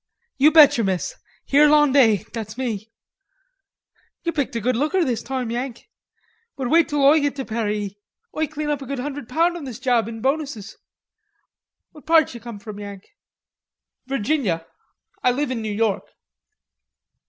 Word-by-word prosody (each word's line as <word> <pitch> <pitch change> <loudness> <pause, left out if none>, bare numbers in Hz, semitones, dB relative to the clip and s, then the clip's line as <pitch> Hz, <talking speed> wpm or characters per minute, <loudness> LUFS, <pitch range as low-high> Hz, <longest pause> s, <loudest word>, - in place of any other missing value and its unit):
"You 290 +3 +7
bet 300 -6 +7
you, - - +2
miss; 190 -3 -1 0.3
Hirlanday; 280 -7 +5
that's 220 -1 -6
me.... 225 -4 -4 1.3
You 335 - 0
picked 285 -7 -2
a - - 0
good 250 +3 0
looker 310 +8 +1
this 245 -4 -1
toime, 255 -3 -3
Yank. 245 - -5 0.7
But 260 -3 -3
wait 330 0 +4
till 290 -1 0
Oi 300 +3 +6
git 285 -1 0
to 270 -2 -4
Paree. 210 -3 -3 0.4
Oi 315 0 0
clane 305 0 -3
up 290 -1 -2
a 270 - -8
good 275 - -3
hundre' 280 -1 -5
pound 335 +6 +1
on 315 - -8
this 250 -5 -7
job 245 -4 +1
in 225 -1 -7
bonuses. 270 -5 -2 1.2
What 300 - -17
part 320 -2 +5
d'ye 235 - -9
come 235 -2 -8
from, 205 0 -9
Yank?" 200 -1 -9 1.0
"Virginia. 245 - -1 0.6
I - - +3
live 265 +2 -1
in 240 -3 -2
New 215 -1 -3
York." 210 -1 0
255 Hz, 160 wpm, -22 LUFS, 220-295 Hz, 1.3 s, You